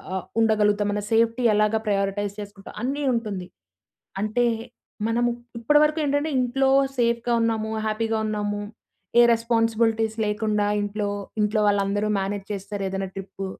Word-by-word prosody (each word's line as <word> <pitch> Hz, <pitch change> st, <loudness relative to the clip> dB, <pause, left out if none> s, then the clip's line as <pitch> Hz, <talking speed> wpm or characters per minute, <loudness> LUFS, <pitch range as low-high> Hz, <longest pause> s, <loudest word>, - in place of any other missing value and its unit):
అ! -, -, +1 dB, 0.2 s
ఉండగలుగుతాం, 210 Hz, -2 st, +2 dB
మన 205 Hz, 0 st, -2 dB
సేఫ్టీ 230 Hz, +2 st, +2 dB
ఎలాగా 210 Hz, +1 st, +2 dB
ప్రయారిటైజ్ 200 Hz, 0 st, 0 dB
చేసుకుంటాం 200 Hz, -1 st, -9 dB
అన్నీ 280 Hz, +3 st, -1 dB
ఉంటుంది. 205 Hz, -6 st, -3 dB, 0.7 s
అంటే 220 Hz, +3 st, +1 dB, 0.6 s
మనము 240 Hz, +1 st, +2 dB, 0.3 s
ఇప్పటివరకు 300 Hz, +5 st, +3 dB
ఏంటంటే 290 Hz, +2 st, 0 dB
ఇంట్లో 265 Hz, +2 st, +2 dB, 0.3 s
సేఫ్‍గా 235 Hz, 0 st, +1 dB
ఉన్నాము, 220 Hz, -1 st, -1 dB, 0.2 s
హ్యాపీ‌గా 225 Hz, +1 st, 0 dB
ఉన్నాము, 205 Hz, -1 st, -2 dB, 0.6 s
ఏ -, -, +10 dB
రెస్పాన్సిబిలిటీస్ 225 Hz, -1 st, +1 dB
లేకుండా 210 Hz, -1 st, 0 dB
ఇంట్లో, 205 Hz, 0 st, -2 dB, 0.3 s
ఇంట్లో 210 Hz, +1 st, +1 dB
వాళ్ళందరూ 205 Hz, +1 st, 0 dB
మేనేజ్ 195 Hz, 0 st, -3 dB
చేస్తారు, 200 Hz, 0 st, -5 dB
ఏదైనా 195 Hz, 0 st, -3 dB
ట్రిప్పు 195 Hz, 0 st, -6 dB
215 Hz, 125 wpm, -24 LUFS, 205-230 Hz, 0.7 s, ఏ